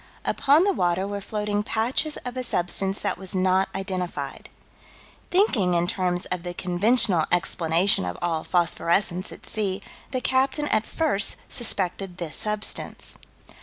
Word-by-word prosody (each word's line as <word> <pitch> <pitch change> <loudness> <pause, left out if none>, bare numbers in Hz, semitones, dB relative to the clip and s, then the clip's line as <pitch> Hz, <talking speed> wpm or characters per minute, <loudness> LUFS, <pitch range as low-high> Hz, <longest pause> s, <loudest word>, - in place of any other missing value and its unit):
Upon 290 +5 +4
the 400 0 +2
water 180 - 0
were 200 0 -4
floating 210 0 -2
patches 245 +6 0
of 250 0 -5
a 255 - -3
substance 190 -2 +1
that - - -2
was 190 -1 -5
not 185 +1 +2
identified. 185 -2 -4 0.8
Thinking 240 - +3
in 170 0 +2
terms 180 0 0
of 180 -1 -1
the 175 0 -6
conventional 185 -1 +2
explanation 175 - +2
of 90 0 -4
all 165 -2 -1
phosphorescence 175 +1 0
at - - -11
sea, 200 -3 -2 0.3
the 255 - -2
captain 265 +4 +1
at 215 +1 +1
first 250 -12 +1
suspected 195 -5 0
this 170 -4 -1
substance. 210 0 -1
195 Hz, 140 wpm, -25 LUFS, 175-225 Hz, 0.8 s, Upon